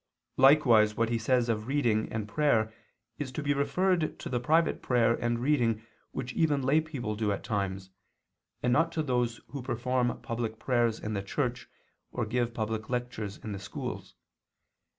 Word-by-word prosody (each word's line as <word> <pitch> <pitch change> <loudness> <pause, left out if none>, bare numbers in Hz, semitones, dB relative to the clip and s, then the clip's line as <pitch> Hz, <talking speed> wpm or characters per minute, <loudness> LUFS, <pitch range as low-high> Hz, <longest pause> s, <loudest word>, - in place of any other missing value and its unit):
Likewise 125 -6 +6
what 115 0 +2
he 115 -1 0
says 120 +1 +2
of 110 -1 -1
reading 120 -6 +1
and 110 -2 -3
prayer 110 -3 +2 0.5
is 140 -3 -3
to 145 +3 -4
be 145 0 +2
referred 170 +4 +1
to - - -6
the 125 - 0
private 160 +6 +2
prayer 120 -2 +3
and 120 0 -1
reading 120 -4 +1 0.3
which 125 -1 -5
even 145 -4 +2
lay 145 +5 +4
people 130 -9 -4
do 105 -1 0
at 100 - -3
times, 95 -2 -3 0.7
and 120 - +3
not 165 +5 +3
to 160 - 0
those 125 -4 0
who 140 - -5
perform 125 0 -1
public 115 -1 -3
prayers 120 -3 +1
in 110 - -4
the 100 - -1
church, 125 +5 -3 0.4
or 120 - -2
give 120 +1 0
public 110 0 -3
lectures 120 -5 -3
in 110 - -5
the 100 - -4
schools. 95 - -6
120 Hz, 170 wpm, -29 LUFS, 110-135 Hz, 0.7 s, Likewise